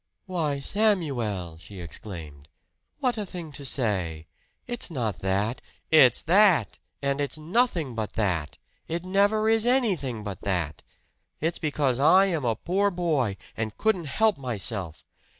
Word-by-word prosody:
"Why, 165 -7 -1
Samuel!" 135 - 0
she 95 +2 -11
exclaimed. 80 -5 -7 0.5
"What 250 -4 +1
a 210 - -2
thing 170 -4 -7
to 140 - -8
say! 95 - -1 0.4
It's 240 -4 -2
not 115 - -2
that 100 +6 0 0.2
" - - -41
"It's 135 -7 +6
that, 175 - +4 0.2
and 140 +1 0
it's 145 +2 -3
nothing 170 - 0
but 110 -2 -4
that! 90 -9 -1 0.3
It 170 +2 -3
never 205 +3 +2
is 225 +1 +3
anything 185 - +1
but 100 -4 -6
that! 85 -7 -2 0.6
It's 165 +2 -1
because 145 -5 0
I 185 +7 +6
am 170 -7 -1
a 115 -2 +1
poor 195 - +1
boy, 155 - 0 0.2
and 110 -1 -3
couldn't 205 -6 +1
help 215 +5 +2
myself! 100 - -3
140 Hz, 145 wpm, -26 LUFS, -, 0.6 s, It's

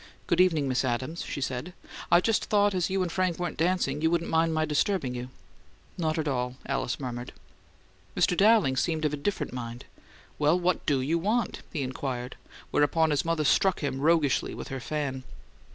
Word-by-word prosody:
"Good - - +3
evening, 160 -6 +3
Miss 130 0 +1
Adams," 130 +6 -2
she - - -5
said. 130 +7 -3 0.4
"I 175 - +7
just 225 +2 +1
thought 205 -1 +3
as 180 -3 0
you 190 0 +1
and 175 - -3
Frank 185 -2 0
weren't 175 0 -3
dancing 160 -4 0
you 160 - +3
wouldn't 170 0 0
mind 165 0 +3
my 155 0 +1
disturbing 150 -2 0
you 125 0 -5 0.3
" - - -32
"Not 160 -2 -1
at 155 -1 -1
all," 125 -2 -1
Alice 135 -3 -2
murmured. 125 -2 -5 0.8
Mr. 180 - +3
Dowling 205 -9 +4
seemed 160 +1 0
of 150 - 0
a - - +1
different 150 +3 -3
mind. 120 -1 -6 0.5
"Well, 150 +4 +3
what 180 0 0
DO 140 -3 +2
you 160 +6 0
want?" 215 +5 -1
he 145 - -2
inquired, 130 -1 -4 0.4
whereupon 160 +2 +3
his 145 - +1
mother 165 -2 0
struck 190 +5 +3
him 135 -2 -2
roguishly 155 -3 +2
with - - -7
her 135 - -4
fan. 135 0 -3
155 Hz, 190 wpm, -28 LUFS, 130-175 Hz, 0.8 s, I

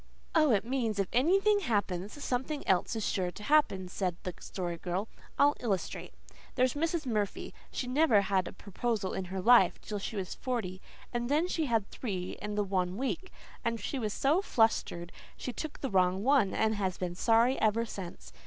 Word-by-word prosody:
"Oh, 310 -2 +5
it 215 -3 +3
means 235 -4 -1
if 195 -2 0
anything 390 - +4
happens 205 - -2
something 265 +4 -2
else 190 +4 +2
is 220 - -2
sure 185 -2 0
to 210 - -10
happen," 245 -9 +3
said 180 -1 -2
the 180 - -4
Story 175 -3 -4
Girl. 185 +5 -3 0.3
"I'll 290 +1 +5
illustrate. 200 -6 -3 0.4
There's 255 -1 +3
Mrs. 325 +1 -1
Murphy. 210 -5 -2 0.2
She - - -3
never 255 -4 +4
had 190 -2 +1
a - - -6
proposal 205 0 -2
in 190 - -3
her 190 +1 -4
life 240 +5 +5
till 210 -1 -5
she 210 - -5
was 190 -3 -3
forty, 205 -8 -3 0.3
and 240 0 -1
then 305 +5 +2
she 320 -4 -1
had 225 -5 +1
three 185 -7 -4
in 210 0 -4
the 210 - +2
one 185 -1 -1
week, 275 +9 -3 0.3
and 230 0 -1
she 275 - -3
was 215 -3 -1
so 295 - +2
flustered 225 - +1 0.3
she 250 - -5
took 315 +3 -6
the 270 - -2
wrong 185 0 +2
one 260 -7 +4
and 220 0 +1
has 190 -3 -1
been 180 -1 -3
sorry 230 +7 +3
ever 220 +2 +2
since. 190 -5 -8
220 Hz, 190 wpm, -31 LUFS, 190-260 Hz, 0.4 s, Oh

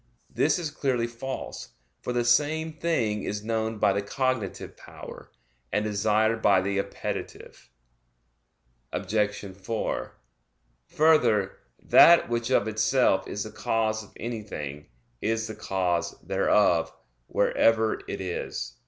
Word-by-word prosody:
This - - +2
is 165 -4 -4
clearly 130 -5 0
false; 120 +3 -6 0.3
for - - -3
the 120 -1 0
same 155 +6 +2
thing 135 -10 -1
is 105 +1 -4
known 110 0 -2
by 100 - +3
the 100 - 0
cognitive 115 -1 -2
power, - - -12 0.4
and 105 +1 0
desired 110 +2 +1
by 100 -3 +5
the 100 +1 -1
appetitive. - - -6 1.2
Obj. 105 +2 -1
4: 105 +4 -3 0.7
Further, 150 -11 +3 0.3
that 170 -5 +7
which 120 0 -1
of 120 -5 +2
itself 110 -2 +2
is 105 - -3
the 110 - -8
cause 110 -1 -1
of 100 - -17
anything, 100 - -6 0.3
is 115 +1 0
the 110 - -6
cause 90 -4 -1
thereof, - - +2 0.4
wherever 110 -1 +2
it - - -4
is. 90 -2 -4
110 Hz, 120 wpm, -26 LUFS, 100-120 Hz, 1.2 s, that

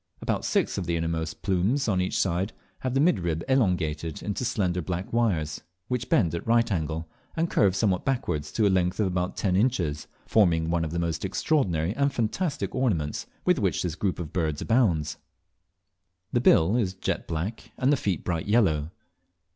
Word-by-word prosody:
About - - -1
six - - +1
of 90 - -4
the 85 -1 0
innermost 80 -1 -2
of - - -29
these - - -40
plumes 100 +9 +1
on 95 -4 +2
each 90 - -1
side 95 +2 0 0.3
have 130 0 -2
the - - +3
midrib 85 - +1
elongated 85 - 0
into 105 +4 -2
slender 90 -7 0
black 90 +4 -4
wires, 85 -10 0 0.3
which 125 -2 -2
bend 85 -8 +3
at 85 - -4
right 115 0 +3
angles, 80 -2 -1 0.3
and 165 +1 0
curve 95 -3 +3
somewhat 95 -2 +1
backwards 75 - -1
to 110 - +2
a - - +5
length 90 0 +1
of 105 - +3
about 90 -1 -2
ten 95 -3 +1
inches, 90 - 0 0.2
forming 85 -6 +3
one 85 -1 +1
of 80 - -2
those 85 0 -2
extraordinary 95 - 0
and 140 +1 +2
fantastic 140 - -2
ornaments 95 - -1 0.2
with - - +3
which - - 0
this 90 -3 -2
group 95 +2 -1
of 80 -4 -6
birds 80 -4 -1
abounds. 90 - +1 1.2
The 120 - +2
bill 90 -2 +5
is 95 -6 0
jet 95 - -3
black, 85 +8 -4
and 135 +3 +3
the - - +5
feet 100 -8 -2
bright 85 -1 -2
yellow. 80 -9 +2
90 Hz, 185 wpm, -26 LUFS, 80-115 Hz, 1.2 s, a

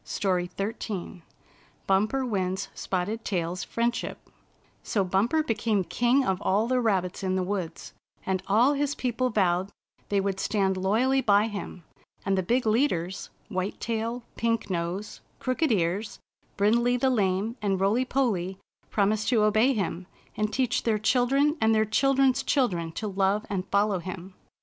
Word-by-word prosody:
STORY 180 -3 -1
XIII 195 -3 -4 0.6
BUMPER 215 +8 +1
WINS 190 -3 -2
SPOTTED 200 +5 -3
TAIL's 175 -2 -2
FRIENDSHIP 235 +1 -2 0.6
So 200 - 0
Bumper 205 - +1
became 220 -5 0
king 245 +8 +2
of 190 -1 0
all 205 +4 +2
the 255 0 +1
rabbits 190 -6 0
in 185 -1 0
the 185 - 0
woods, 180 -4 -4 0.3
and 190 -1 0
all 235 +8 +4
his 290 0 -1
people 255 0 -1
vowed 190 -3 +1 0.4
they 200 - +2
would 195 -1 -1
stand 195 -2 +1
loyally 225 +8 +2
by 210 -2 +4
him, 200 -4 -7 0.4
and 195 - +2
the 190 - +1
big 240 +7 0
leaders 215 - 0
— - - -28
^White 185 +2 -2
Tail, 230 +1 -3
Pink 230 -3 0
Nose, 180 +4 -3 0.2
Crooked 255 +3 0
Ears, 195 +2 0 0.4
Brindley 235 +4 +3
the 260 +1 +2
Lame 205 0 0
and 195 -2 0
Roily 205 +6 +2
Polly 205 -9 -1 0.2
— - - -40
promised 210 +1 +1
to 225 -4 +3
obey 215 +5 +4
him, 185 -4 -3 0.3
and 215 0 -1
teach 250 +1 0
their 225 -2 +1
children 265 +7 +2
and 220 0 +4
their 215 0 +3
children's 270 +4 +3
chil 270 -3 +2
dren 170 -4 -4
to 215 - -4
love 195 +2 +1
and 190 -1 -2
follow 200 -1 +2
him. 185 +1 -7
210 Hz, 160 wpm, -27 LUFS, 190-240 Hz, 0.6 s, all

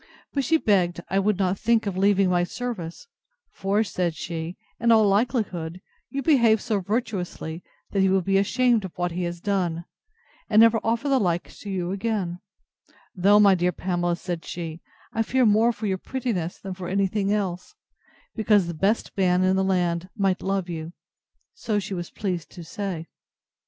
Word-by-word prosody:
But 275 - 0
she 320 +6 +3
begged 180 - +1
I 195 - +3
would 200 0 +1
not 190 -1 0
think 230 -1 +2
of 200 -2 -2
leaving 195 0 +3
my 175 -1 +2
service; 195 - -5 0.4
for, 200 +3 0
said 175 -4 -2
she, 165 +1 -5 0.2
in 235 0 +3
all 220 -2 +6
likelihood, 195 -6 0 0.3
you 275 0 -3
behaved 235 -7 +4
so 215 -3 0
virtuously, 180 -5 -3 0.3
that 200 - 0
he 190 0 +4
will 190 -1 +2
be 195 +2 +2
ashamed 235 +2 +2
of 190 -1 -8
what 175 0 -1
he 175 +1 -2
has 170 0 -4
done, 175 -4 -1 0.6
and 215 - +5
never 225 0 +6
offer 230 +5 0
the 270 -2 +3
like 175 -5 -1
to 205 - -8
you 180 -2 -2
again: 195 -4 -2 0.8
though, 200 +3 +5
my 200 -2 +7
dear 180 0 +1
Pamela, 175 0 -1
said 175 -2 -5
she, 165 -1 -6 0.3
I 225 - 0
fear 255 +3 +2
more 220 +2 +4
for 220 -1 -6
your 190 -2 -1
prettiness 215 -11 -3
than 190 -1 -6
for 185 -1 -7
anything 195 +1 0
else; 195 - -2 0.6
because 210 -3 +3
the 170 - -4
best 195 +8 0
man 185 -1 +3
in 185 0 +3
the 190 - +2
land 180 -2 0
might 195 -2 +1
love 195 -2 -1
you: 165 -1 -6 0.6
so 225 - -2
she 195 -1 -3
was 175 -2 -4
pleased 180 -6 -4
to 175 - -9
say. 180 -1 -4
195 Hz, 180 wpm, -25 LUFS, 175-215 Hz, 0.8 s, my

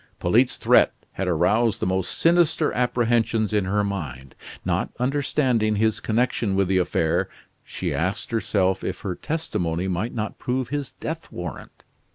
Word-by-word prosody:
Polyte's 115 +9 +3
threat - - +4 0.2
had 95 - -3
aroused 95 +7 +2
the - - -1
most 95 0 -1
sinister 165 -2 +3
apprehensions 120 -3 +1
in 105 -3 +2
her 105 +2 +1
mind. 70 -10 -5 0.3
Not - - 0
understanding 125 -4 +1
his 110 +1 +1
connection 110 -3 0
with 95 -1 +2
the 95 -1 +3
affair, 80 -2 +1 0.3
she - - -4
asked 95 +7 -2
herself 95 -4 +1
if - - -4
her 95 -3 -2
testimony 90 - -2
might 95 +7 -2
not 105 -2 -4
prove 125 0 -2
his 145 -1 -3
death 160 +1 -6
warrant. 90 -5 -8
110 Hz, 150 wpm, -24 LUFS, 95-125 Hz, 0.3 s, threat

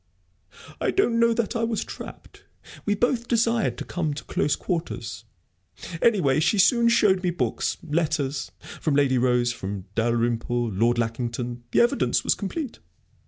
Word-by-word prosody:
"I - - 0
don't 240 -12 +2
know 235 0 +4
that 235 0 -1
I 230 - 0
was 230 -2 -1
trapped. - - -10 0.4
We 205 - +2
both 240 +2 0
desired 230 -2 +1
to - - -6
come 160 -5 -2
to 150 - -7
close 145 - 0
quarters. 140 -10 -4 0.8
Anyway, 175 - +3
she 160 +7 +2
soon 235 +4 +5
showed 200 -5 +4
me 180 - 0
books, 175 - -1
letters 150 -4 -1 0.3
from 155 -3 0
Lady 135 -3 +3
Rose, 120 -1 +2
from 95 -3 -6
Dalrymple, 120 +1 0
Lord 115 +5 +2
Lackington 120 +1 -3
the - - +3
evidence 240 +4 +2
was - - +3
complete.... 235 - -5
155 Hz, 150 wpm, -25 LUFS, -, 0.8 s, soon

